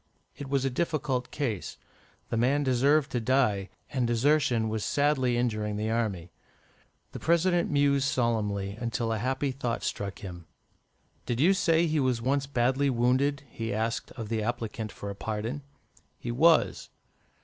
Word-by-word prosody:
It 140 Hz, -2 st, -8 dB
was 135 Hz, -1 st, +1 dB
a 135 Hz, -, 0 dB
difficult 135 Hz, -4 st, -1 dB
case; 120 Hz, -10 st, -3 dB, 0.5 s
the -, -, -1 dB
young -, -, +1 dB
man 140 Hz, +5 st, +2 dB
deserved 140 Hz, +3 st, +3 dB
to 125 Hz, -, 0 dB
die, 110 Hz, -6 st, +1 dB, 0.2 s
and 125 Hz, -3 st, 0 dB
desertion 120 Hz, -1 st, +2 dB
was 110 Hz, -1 st, -2 dB
sadly 135 Hz, -4 st, +1 dB
injuring 110 Hz, -3 st, -1 dB
the 110 Hz, +1 st, -1 dB
army. 100 Hz, -7 st, -2 dB, 0.8 s
The -, -, -7 dB
President 170 Hz, +1 st, +2 dB
mused 140 Hz, -1 st, +2 dB
solemnly, 105 Hz, -6 st, 0 dB
until 115 Hz, -1 st, -1 dB
a 110 Hz, -, -2 dB
happy 130 Hz, +4 st, -1 dB
thought 125 Hz, -3 st, -3 dB
struck 100 Hz, -1 st, -3 dB
him. 90 Hz, -4 st, -9 dB, 0.8 s
"Did 120 Hz, -1 st, -1 dB
you 175 Hz, +7 st, +5 dB
say 165 Hz, -3 st, +3 dB
he 155 Hz, -2 st, +1 dB
was 130 Hz, -3 st, +1 dB
once 135 Hz, +3 st, 0 dB
badly 135 Hz, +1 st, +1 dB
wounded?" 130 Hz, +3 st, +1 dB
he 115 Hz, -1 st, -5 dB
asked 110 Hz, +2 st, -2 dB
of 115 Hz, -4 st, -7 dB
the 115 Hz, -1 st, -1 dB
applicant 115 Hz, -1 st, -3 dB
for 100 Hz, -, -6 dB
a -, -, -7 dB
pardon. 110 Hz, +7 st, -4 dB, 0.6 s
"He 120 Hz, -, -5 dB
was." 125 Hz, -, +3 dB
125 Hz, 160 wpm, -28 LUFS, 110-140 Hz, 0.8 s, you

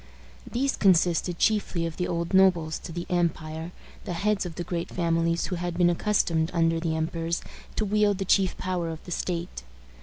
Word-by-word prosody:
These 270 Hz, +3 st, 0 dB
consisted 175 Hz, -2 st, +3 dB
chiefly 200 Hz, -5 st, +1 dB
of 165 Hz, -1 st, -5 dB
the 180 Hz, -, -1 dB
old 170 Hz, +1 st, -2 dB
nobles 175 Hz, -4 st, +3 dB
of 165 Hz, -, -8 dB
the 175 Hz, -, -3 dB
empire, 165 Hz, -1 st, -1 dB, 0.3 s
the 185 Hz, -, -3 dB
heads 200 Hz, +2 st, 0 dB
of 165 Hz, -, -9 dB
the 175 Hz, -, -3 dB
great 170 Hz, 0 st, -3 dB
families 165 Hz, -1 st, +1 dB
who 180 Hz, -, -3 dB
had 175 Hz, 0 st, -3 dB
been 175 Hz, -1 st, +4 dB
accustomed, 170 Hz, -4 st, +1 dB
under 165 Hz, 0 st, +2 dB
the 165 Hz, -1 st, -1 dB
emperors, 165 Hz, +1 st, -2 dB, 0.3 s
to 215 Hz, -, 0 dB
wield 205 Hz, -1 st, +2 dB
the 195 Hz, -, -2 dB
chief 190 Hz, 0 st, +2 dB
power 180 Hz, -2 st, -2 dB
of 160 Hz, -1 st, -7 dB
the 175 Hz, -, -10 dB
state. 170 Hz, -, -3 dB
175 Hz, 185 wpm, -27 LUFS, 165-185 Hz, 0.3 s, been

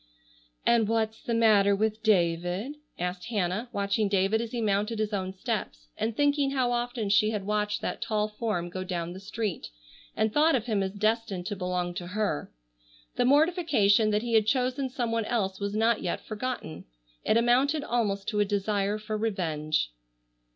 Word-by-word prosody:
"And 235 Hz, -2 st, +4 dB
what's 225 Hz, -1 st, 0 dB
the 235 Hz, -, -2 dB
matter 205 Hz, -3 st, +5 dB
with 215 Hz, +1 st, -1 dB
David?" 180 Hz, -, +1 dB, 0.2 s
asked 180 Hz, +1 st, -3 dB
Hannah, 210 Hz, +1 st, -1 dB
watching 200 Hz, +1 st, 0 dB
David 195 Hz, +3 st, +2 dB
as 235 Hz, -, -4 dB
he 240 Hz, -, -3 dB
mounted 210 Hz, +1 st, 0 dB
his 215 Hz, 0 st, -1 dB
own 190 Hz, -2 st, -2 dB
steps, -, -, -4 dB
and 225 Hz, 0 st, -2 dB
thinking 285 Hz, -1 st, +2 dB
how 260 Hz, -3 st, +1 dB
often 240 Hz, -3 st, -2 dB
she 210 Hz, +1 st, +4 dB
had 210 Hz, -3 st, -3 dB
watched 210 Hz, 0 st, -1 dB
that -, -, -3 dB
tall 215 Hz, -2 st, 0 dB
form 210 Hz, -5 st, -3 dB
go 185 Hz, +1 st, -4 dB
down 175 Hz, -2 st, -3 dB
the 185 Hz, -, -8 dB
street, 210 Hz, -2 st, -4 dB, 0.5 s
and 220 Hz, 0 st, +1 dB
thought 310 Hz, +1 st, +4 dB
of 235 Hz, -3 st, -1 dB
him 215 Hz, -5 st, 0 dB
as 190 Hz, 0 st, -2 dB
destined 215 Hz, -3 st, -1 dB
to 205 Hz, +1 st, -3 dB
belong 180 Hz, -1 st, -2 dB
to 175 Hz, 0 st, -6 dB
her. 205 Hz, -5 st, -2 dB, 0.7 s
The -, -, +3 dB
mortification 280 Hz, -, +4 dB
that 210 Hz, +1 st, +1 dB
he 235 Hz, -1 st, -2 dB
had 220 Hz, -1 st, +4 dB
chosen 260 Hz, +2 st, +1 dB
some 245 Hz, -2 st, -2 dB
one 230 Hz, -1 st, 0 dB
else 195 Hz, -5 st, -1 dB
was 200 Hz, 0 st, -3 dB
not 225 Hz, +1 st, +2 dB
yet 175 Hz, -, -3 dB
forgotten. 215 Hz, -8 st, -5 dB, 0.4 s
It 220 Hz, -, +3 dB
amounted 260 Hz, +6 st, +3 dB
almost 210 Hz, -7 st, -1 dB
to 210 Hz, -, -1 dB
a -, -, +5 dB
desire 205 Hz, 0 st, 0 dB
for 215 Hz, 0 st, -4 dB
revenge. 155 Hz, -, -1 dB
215 Hz, 180 wpm, -28 LUFS, 195-235 Hz, 0.7 s, matter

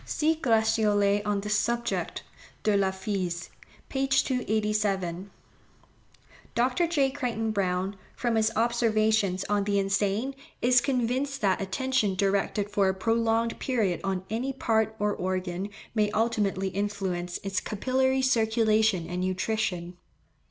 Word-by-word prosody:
See 315 Hz, +1 st, +1 dB
Gratiolet 220 Hz, -6 st, +2 dB
on 205 Hz, -1 st, 0 dB
this 210 Hz, +1 st, 0 dB
subject, 235 Hz, +2 st, -1 dB, 0.4 s
De 210 Hz, -1 st, +3 dB
la 195 Hz, -1 st, +3 dB
Phys. 190 Hz, -3 st, -3 dB, 0.4 s
p. 270 Hz, 0 st, -1 dB
287. 210 Hz, -8 st, 0 dB, 1.3 s
Dr. 250 Hz, +8 st, +2 dB
J. 285 Hz, -5 st, +2 dB
Crichton 235 Hz, -5 st, -2 dB
Browne, 190 Hz, -1 st, -1 dB, 0.2 s
from 240 Hz, -2 st, -1 dB
his 220 Hz, 0 st, +2 dB
observations 220 Hz, -4 st, +2 dB
on 205 Hz, -1 st, +1 dB
the 200 Hz, -1 st, +1 dB
insane, 200 Hz, +6 st, 0 dB, 0.3 s
is 245 Hz, 0 st, +4 dB
convinced 265 Hz, +2 st, -1 dB
that 195 Hz, -2 st, +2 dB
attention 215 Hz, 0 st, 0 dB
directed 200 Hz, +1 st, 0 dB
for 200 Hz, -2 st, +3 dB
a 190 Hz, -, -1 dB
prolonged 230 Hz, +2 st, +1 dB
period 215 Hz, -9 st, 0 dB
on 190 Hz, -1 st, -2 dB
any 245 Hz, +5 st, -1 dB
part 220 Hz, -4 st, +1 dB
or 210 Hz, 0 st, 0 dB
organ 185 Hz, +1 st, -3 dB, 0.2 s
may 210 Hz, -2 st, +2 dB
ultimately 205 Hz, -4 st, +1 dB
influence 190 Hz, -3 st, -2 dB
its 195 Hz, -1 st, -1 dB
capillary 260 Hz, +4 st, 0 dB
circulation 220 Hz, -6 st, +2 dB
and 180 Hz, +1 st, -3 dB
nutrition. 185 Hz, -2 st, -2 dB
215 Hz, 125 wpm, -27 LUFS, 195-235 Hz, 1.3 s, is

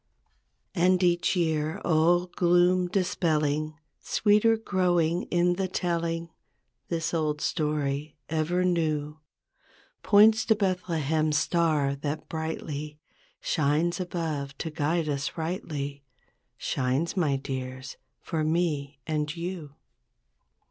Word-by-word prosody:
"And 180 Hz, +1 st, +3 dB
each 175 Hz, 0 st, +2 dB
year, 160 Hz, -3 st, 0 dB
all 175 Hz, +2 st, +3 dB
gloom 180 Hz, 0 st, +3 dB
dispelling. 155 Hz, -5 st, 0 dB, 0.2 s
Sweeter 215 Hz, +2 st, +3 dB
growing 175 Hz, -5 st, +1 dB
in 175 Hz, 0 st, +2 dB
the 190 Hz, -1 st, 0 dB
telling. 170 Hz, -2 st, -2 dB, 0.6 s
This 165 Hz, -1 st, -2 dB
old 155 Hz, -2 st, 0 dB
story, 150 Hz, -2 st, -1 dB
ever 160 Hz, +3 st, 0 dB
new, 155 Hz, -4 st, 0 dB, 0.8 s
Points 220 Hz, +2 st, +6 dB
to 220 Hz, -, +4 dB
Bethlehem's 160 Hz, -6 st, 0 dB
star 155 Hz, -4 st, +1 dB
that 145 Hz, +2 st, -4 dB
brightly 155 Hz, -2 st, -4 dB, 0.4 s
Shines 155 Hz, +4 st, +1 dB
above 155 Hz, -6 st, -3 dB
to 160 Hz, -, -4 dB
guide 155 Hz, +2 st, 0 dB
us 140 Hz, 0 st, -2 dB
rightly, 150 Hz, -4 st, -4 dB, 0.5 s
Shines, 135 Hz, +7 st, -1 dB
my 155 Hz, -7 st, +2 dB
dears, 130 Hz, -1 st, -5 dB, 0.2 s
for 160 Hz, -3 st, -2 dB
me 155 Hz, -4 st, 0 dB
and 150 Hz, 0 st, -2 dB
you. 170 Hz, -4 st, -5 dB
160 Hz, 100 wpm, -27 LUFS, 150-175 Hz, 0.8 s, Points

